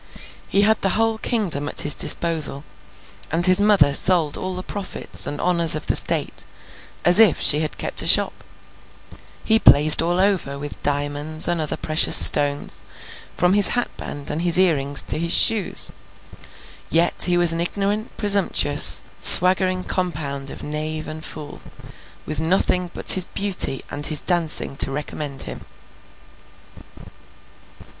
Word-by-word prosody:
He 200 - 0
had 220 +1 0
the 195 0 -1
whole 225 0 -2
kingdom 175 - -4
at - - -1
his 150 - +4
disposal, 155 -4 0 0.7
and 170 +2 0
his 185 +2 +3
mother 200 -9 +2
sold 165 -1 +1
all 185 0 -6
the 185 - -7
profits 200 0 -6
and 145 - -7
honours 170 -3 +3
of 155 - -7
the - - -2
State, - - 0 0.6
as 175 +3 +4
if 215 -8 +4
she 150 - +3
had 155 -1 -6
kept - - -1
a - - -3
shop. - - +2 1.0
He 220 0 +2
blazed 150 -3 +5
all 175 +2 -2
over 190 -8 -2
with 145 +1 -10
diamonds 145 +2 -2
and 175 -2 -3
other 155 - -5
precious 155 +1 +1
stones, 145 -1 +3 0.5
from 180 +1 0
his 205 -1 +3
hatband 145 -11 -7
and 160 - -5
his 175 0 +1
earrings 145 -7 +2
to - - -4
his 170 0 0
shoes. 215 -5 0 1.0
Yet 170 +1 0
he 175 0 0
was 175 -1 +1
an 165 - -4
ignorant 200 +4 -5
presumptuous, 195 -8 +3 0.2
swaggering 185 0 +5
compound 145 -8 -6
of - - -11
knave 155 +1 -6
and 155 0 -10
fool, 150 -2 -10 0.6
with 155 0 -5
nothing 180 +2 -2
but - - +5
his 185 -2 +4
beauty 190 -10 -1
and 145 0 -3
his 155 -2 +2
dancing 170 -5 -3
to - - +6
recommend 145 0 -7
him. - - -9
165 Hz, 150 wpm, -19 LUFS, 145-185 Hz, 1.0 s, to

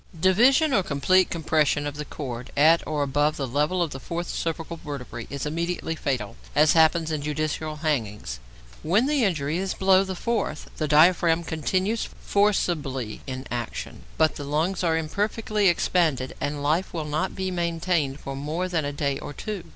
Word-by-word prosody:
Division 255 - +4
or 200 - +4
complete 180 +4 +2
compression 155 -3 +1
of 145 -1 -4
the 150 0 -5
cord 125 -5 -6
at 160 +3 +6
or 150 -2 0
above 145 +2 +1
the 140 - -2
level 150 +8 +1
of 165 - -3
the 135 - -6
fourth 170 +4 -4
cervical 165 0 -3
vertebra 140 -6 -7
is 140 0 -4
immediately 170 +2 -2
fatal 130 -9 -3 0.2
(as 150 +1 +5
happens 160 0 +4
in 155 -2 -2
judicial 155 +1 -2
hanging). 135 - -2 0.6
When 200 +10 +2
the 290 -2 +2
injury 160 -4 0
is 190 0 -2
below 190 0 +4
the 190 -1 -4
fourth, 220 -7 -2
the 155 - -1
diaphragm 165 +2 +4
continues 185 +8 -1
forcibly 155 - 0
in 130 0 -5
action, 120 -2 -5 0.2
but 160 -1 +2
the 145 - -5
lungs 160 +7 -1
are 165 -2 +2
imperfectly 210 +5 0
expanded, 160 -7 +1
and 145 0 -2
life 160 +6 0
will 160 -2 -2
not 155 +5 -2
be 190 0 -2
maintained 170 -4 -1
for 135 - -5
more 155 +6 -2
than 165 -5 -1
a 145 - -2
day 140 -1 -1
or - - -7
two. 200 +3 -5
160 Hz, 175 wpm, -25 LUFS, 145-180 Hz, 0.6 s, at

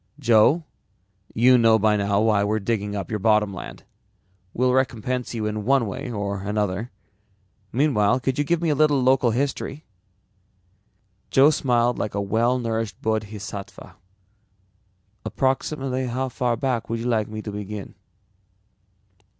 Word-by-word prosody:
"Joe, 125 +5 +4 0.7
you 125 +2 +5
know 115 -1 +5
by 110 0 +2
now 100 0 +1
why 110 -2 +3
we're 105 +1 0
digging 105 -1 -2
up 100 -2 -5
your 105 - -1
bottom 105 -1 +2
land. 90 - -9 0.7
We'll 125 +3 +1
recompense 125 -1 -1
you 110 -2 -2
in 105 0 -3
one 135 +1 +2
way 125 +6 -5
or 100 -3 -3
another. 105 +2 -2 0.8
Meanwhile, 125 -3 +2
could 130 +1 -1
you - - +3
give 170 +3 0
me 165 - +1
a - - +3
little 150 -1 +3
local 130 -1 +3
history?" 140 +4 -3 1.4
Joe 140 +3 +5
smiled 120 -4 +1
like 105 - -3
a - - 0
well 115 +5 +1
nourished 115 -3 -3
bodhisattva. 105 -3 -5 1.3
"Approximately 130 -1 -1
how 130 +2 -2
far 120 -1 -1
back 130 -4 -2
would 115 - -1
you 115 - -5
like 110 -3 +1
me 110 0 -7
to 105 - -5
begin?" 105 0 -7
115 Hz, 140 wpm, -23 LUFS, 105-130 Hz, 1.4 s, you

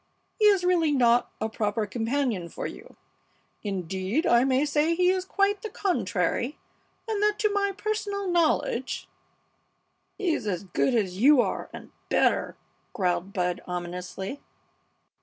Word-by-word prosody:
He 425 - +4
is 400 -3 +5
really 350 -4 +3
not 245 -3 +3
a 220 - -1
proper 215 0 -1
companion 225 -4 -1
for - - -6
you. - - -9 0.7
Indeed, 190 - -2
I 235 +1 +5
may 265 +2 +2
say 300 +3 +2
he 360 +1 +3
is 375 -1 -1
quite 400 +1 +1
the 440 - -5
contrary, 355 - -1 0.5
and 430 -2 -1
that 420 0 +2
to 425 -3 +1
my 400 -1 +1
personal 405 0 -3
knowledge 320 -7 0 0.5
" - - -46
"He's 345 - -1
as 185 -2 -2
good 200 +7 0
as 190 -4 0
you 280 +4 +6
are - - 0
and - - -11 0.2
better!" - - +2 0.4
growled 185 -2 -1
Bud, 180 -2 -1
ominously. 180 +6 -5
265 Hz, 140 wpm, -26 LUFS, -, 0.7 s, you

